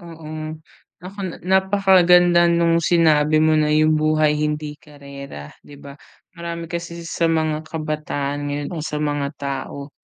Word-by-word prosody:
Oo. 165 -3 -11 0.7
Naku 195 +2 -9
na 170 - -7
napakaganda 185 -3 +4
nung 170 0 +3
sinabi 155 -2 +3
mo 155 0 +3
na 150 0 +2
yung 155 0 +3
buhay 155 -1 +2
hindi 150 0 -3
karera, 140 - -11 0.2
di 145 - -13
ba? 140 -1 -11 0.4
Marami 170 0 -5
kasi 170 0 -6
sa 165 0 -1
mga 155 -1 -1
kabataan 150 -3 -3
ngayon 145 0 -3
o 170 - -5
sa 150 0 -4
mga 145 -1 -1
tao, 140 +1 -6
155 Hz, 145 wpm, -21 LUFS, 150-170 Hz, 0.7 s, napakaganda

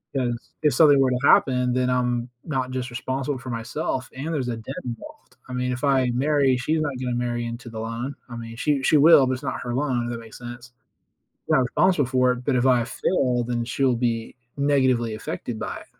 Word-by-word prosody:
'Cause 120 -3 -2
if 150 -3 +4
something 145 +1 +6
were 135 -1 +3
to 125 - 0
happen, 125 -1 +4
then 125 0 +1
I'm 125 -1 0 0.2
not 130 -5 -2
just 130 0 -3
responsible 130 +3 -3
for 130 - -9
myself 130 +3 -3
and 150 +5 -4
there's 135 -5 -1
a 120 -2 -2
debt 115 +4 -7
involved. 295 - -9
I - - -6
mean, 125 0 -1
if 125 +2 -5
I 135 -3 +3
marry, 140 -1 +2
she's 155 +6 0
not 145 -2 -1
gonna 125 -1 -2
marry 120 -1 -2
into 115 +1 -6
the 110 -1 -7
loan, 115 +5 -4
I 120 - -7
mean, 115 0 -8
she 140 +3 0
she 150 - +4
will, 145 -2 +7
but 130 - 0
it's 130 - -6
not - - -3
her 120 -1 -3
loan, 130 -3 0
if - - -4
that 120 - -4
makes 115 -1 -12
sense. 120 +1 -9 0.8
Yeah, - - +4
I'm 135 - +4
responsible 150 +4 +2
for 130 0 +2
it, 125 0 -7
but 140 - +1
if 125 - +2
I 125 -2 +4
fail, 125 -2 0
then 120 -1 -1
she'll 130 +1 +1
be 115 -1 -2 0.2
negatively 130 -5 +2
affected 110 +1 -5
by - - -4
it. - - -13
125 Hz, 225 wpm, -24 LUFS, 120-135 Hz, 0.8 s, will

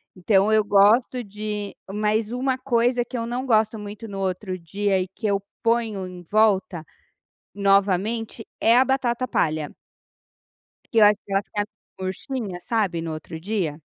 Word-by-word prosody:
Então 195 +2 +3
eu 215 -1 +4
gosto 220 +5 +4
de 210 0 -5 0.2
mas 215 +1 0
uma 255 +1 0
coisa 245 -1 +1
que 245 - -6
eu 230 - -2
não 245 +3 -3
gosto 220 -2 +2
muito 210 +2 -8
no 200 -2 -6
outro 185 0 -2
dia 195 +3 0
e 185 - -2
que 205 +4 -5
eu 200 -1 +1 0.2
ponho 230 -4 +1
em 180 -1 -10
volta 200 -6 +2 0.7
novamente 200 +3 +1
é 230 +2 +5
a 255 - +7
batata 255 -2 0
palha 155 -8 0 1.2
Que 230 - +3
eu 210 - +8
acho 205 0 +5
que - - -12
ela 195 - +3
fica 205 0 -3 0.3
murchinha, 190 +1 -4
sabe, 195 -6 0
no 165 -1 -4
outro 160 +1 -7
dia? 175 -5 -2
210 Hz, 160 wpm, -24 LUFS, 190-230 Hz, 1.2 s, eu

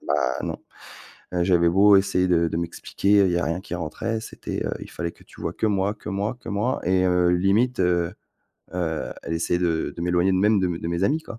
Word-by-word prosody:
bah - - +1 0.2
non, - - -3 0.8
heu 90 -1 +1
j'avais 85 -2 +4
beau 100 +4 +6
essayer 90 -1 +2
de 85 -2 +2
de 80 - -3
m'expliquer, 85 +3 -3
il 90 - +2
y 85 - +1
avait - - 0
rien 85 +2 -2
qui 95 -2 -6
rentrait. 100 +8 -3
C'était, 110 - -6
heu - - -2
il - - -9
fallait 85 -1 -4
que - - -21
tu - - -17
vois - - -3
que - - -1
moi 100 0 0
que 105 - -11
moi 105 +4 -2
que - - -11
moi 105 +6 -1
et 95 +1 +2
heu, 90 -1 +3
limite, 100 +8 +2
heu, 90 -1 +1 0.6
heu, 80 -3 -2
elle - - -5
essayait 85 +1 0
de 85 -3 0
de 85 - -4
m'éloigner 90 +2 +2
de 95 - +2
même 105 +2 +3
de 95 - +1
de 85 -1 -3
mes 85 +2 0
amis, 155 +8 +1
quoi. 115 - -9
90 Hz, 235 wpm, -24 LUFS, 85-100 Hz, 0.8 s, beau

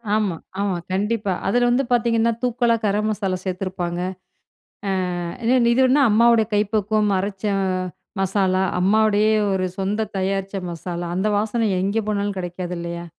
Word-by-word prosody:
ஆமா, 210 -5 0 0.3
ஆமா. 200 -2 0 0.2
கண்டிப்பா 205 +1 0
அதுல 245 +4 +3
வந்து 245 +3 +2
பார்த்தீங்கன்னா, 230 -1 +2
தூக்கலா 240 -1 +2
கர 205 0 +1
மசாலா 195 -3 -1
சேர்த்துருப்பாங்க. 185 -2 -3 1.2
அ 225 +8 -1
இது 235 +2 +3
வந்து 265 +3 +4
அம்மாவோட 230 +1 +5
கைப்பக்குவம் 210 0 +1
அரைச்ச 195 +1 -4 0.8
மசாலா 190 -1 +1 0.2
அம்மாவுடைய 215 +2 +3 0.2
ஒரு 185 -1 0
சொந்த 205 +3 -1
தயாரிச்ச 195 +1 -2
மசாலா. 175 +1 -5
அந்த 195 +3 +1
வாசன 220 +1 0
எங்கே 200 +4 0
போனாலும் 205 -1 -1
கெடைக்காது 180 0 -4
இல்லையா? 170 0 -5
205 Hz, 125 wpm, -22 LUFS, 185-220 Hz, 1.2 s, அம்மாவோட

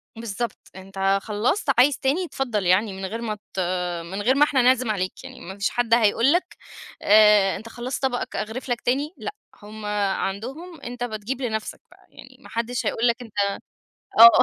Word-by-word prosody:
بالضبط، 230 0 -4 0.2
أنت 195 +1 0
خلصت، 225 - -1
عايز 270 +1 +5
تاني 295 +7 +1
اتفضل 235 - -2
يعني 195 +3 +3
من 190 0 -5
غير 225 +5 -5
ما 215 -2 -2 0.2
ت 190 - -3 0.5
من 190 +4 -5
غير 255 +5 +3
ما 290 - +5
إحنا 275 -3 +3
نعزم 250 -2 +3
عليك 185 +3 -3
يعني 260 -1 -10
ما 190 +2 -8
فيش 200 - 0
حد 240 -2 0
هيقول 230 +3 +4
لك 355 - -1 0.5
آآ، 210 -2 +6
أنت 230 +1 -8
خلصت 245 +4 -5
طبقك 245 -2 -1
أغرف 225 +5 -4
لك 240 - -1
تاني؟ 280 +7 0
لأ، 410 - -5 0.3
هم 215 0 -9
عندهم 210 - -3
أنت 245 0 -6
بتجيب 235 +3 -4
لنفسك 220 -3 -3
بقى - - -22
يعني - - -15
ما - - -15
حدش 235 +2 -2
هيقول 235 +2 +1
لك 235 - +3
أنت 225 -3 -11 0.9
آه، 230 +1 +10
230 Hz, 185 wpm, -24 LUFS, 205-255 Hz, 0.9 s, آه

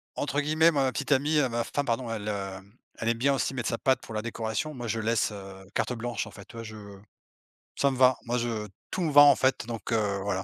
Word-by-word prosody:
entre 145 0 -1
guillemets, 155 +3 +4
ma 135 -3 +1
petite 140 0 -3
amie, 145 +3 +3
heu, 130 -4 +2
ma 120 0 -1
femme 145 +3 -2
pardon, 120 0 -1
elle, 105 -2 -3
hem, 100 0 -6 0.2
elle 115 - 0
aime 115 - +1
bien 140 +4 +2
aussi 135 - -1
mettre 125 -3 -3
sa 115 - -1
patte 130 +1 +2
pour 115 - -10
la 110 - -1
décoration. 115 +6 -3
Moi 120 -3 -6
je 110 +1 -1
laisse, 110 -1 +1
heu, 95 -1 -10
carte - - 0
blanche, 120 0 -3
en - - -11
fait. 100 -3 -12
Tu - - -15
vois 115 - -6
je 110 -1 -9 1.0
ça 140 - +2
me 130 - -4
va 130 0 +5
moi 120 +1 0
je 115 -3 -2 0.2
tout - - -2
me 165 - +1
va 145 0 +9
en 145 -2 +8
fait 130 -3 +1
donc 115 -1 -5
heu, 105 -3 +1
voilà. 95 -1 -1
120 Hz, 260 wpm, -28 LUFS, 110-135 Hz, 1.0 s, va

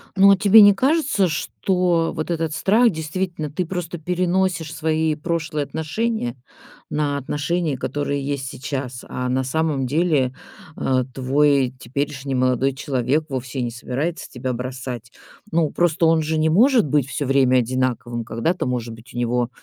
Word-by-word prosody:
Ну, 200 +1 +7
а 195 - +5
тебе 210 +2 +7
не 205 0 +8
кажется, 265 - +2
что 175 +1 0
вот 155 +2 -3
этот 165 -2 -1
страх 225 +7 +4
действительно, 160 -1 -3
ты 175 +5 -2
просто 175 -1 -4
переносишь 180 -1 0
свои 160 0 0
прошлые 160 -1 -2
отношения 160 - -2 0.5
на 145 -1 -1
отношения, 150 +2 -1
которые 140 +1 -2
есть 140 -2 -3
сейчас, 130 -2 -5
а 125 0 -3
на 130 +1 +1
самом 145 0 0
деле, 145 -4 +1 0.4
а, 130 -2 0
твой 135 0 +2
теперешний 135 +2 -3
молодой 130 +1 +2
человек 135 +2 -1
вовсе 130 -1 -4
не 120 -1 -2
собирается 140 +8 -4
тебя 125 +1 -4
бросать. 125 -1 -6 0.4
Ну, 160 -2 +2
просто 170 0 +1
он 160 0 +4
же 155 +1 -1
не 155 +1 +2
может 235 - +5
быть 140 -2 +1
всё 140 +1 -3
время 130 -1 +3
одинаковым. 120 -1 -2
Когда-то, 120 - -1
может 120 -2 -3
быть, 115 +2 -14
у - - -8
него 120 0 0
145 Hz, 155 wpm, -22 LUFS, 130-170 Hz, 0.5 s, не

